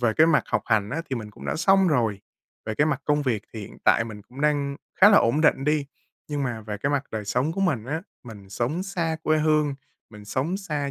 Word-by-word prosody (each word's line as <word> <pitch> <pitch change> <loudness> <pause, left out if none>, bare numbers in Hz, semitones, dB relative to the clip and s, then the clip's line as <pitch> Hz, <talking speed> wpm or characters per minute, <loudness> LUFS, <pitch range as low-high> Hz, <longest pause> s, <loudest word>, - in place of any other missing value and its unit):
về 120 -3 +2
cái 160 - +6
mặt 155 - +4
học - - -1
hành 105 -1 +1
á, 165 - -2
thì 130 - -1
mình 105 -2 -7
cũng - - -13
đã - - -1
xong 195 +2 +4
rồi, 115 -9 +1 0.5
về 110 - -2
cái 150 - +2
mặt 145 -3 -1
công 150 0 +1
việc 115 -7 -1
thì 110 - -6
hiện 100 - -10
tại 115 - +4
mình 105 -2 -9
cũng 125 +6 -12
đang 145 -2 +1 0.2
khá 195 - +10
là 205 - +7
ổn 120 +7 +2
định 140 -3 +3
đi. 150 -1 +1 0.4
Nhưng 145 -1 -2
mà 120 -4 -3
về 105 -1 -5
cái 140 +6 -1
mặt 140 0 0
đời 110 -1 -3
sống 125 +10 0
của 195 - -4
mình 140 - 0
á, 160 +6 -3 0.2
mình 105 -4 -11
sống 125 - -2
xa 170 -5 -2
quê 155 0 +2
hương, 150 -2 +2 0.4
mình 105 -1 -12
sống 140 - -2
xa 150 -8 -3
140 Hz, 255 wpm, -25 LUFS, 115-155 Hz, 0.5 s, khá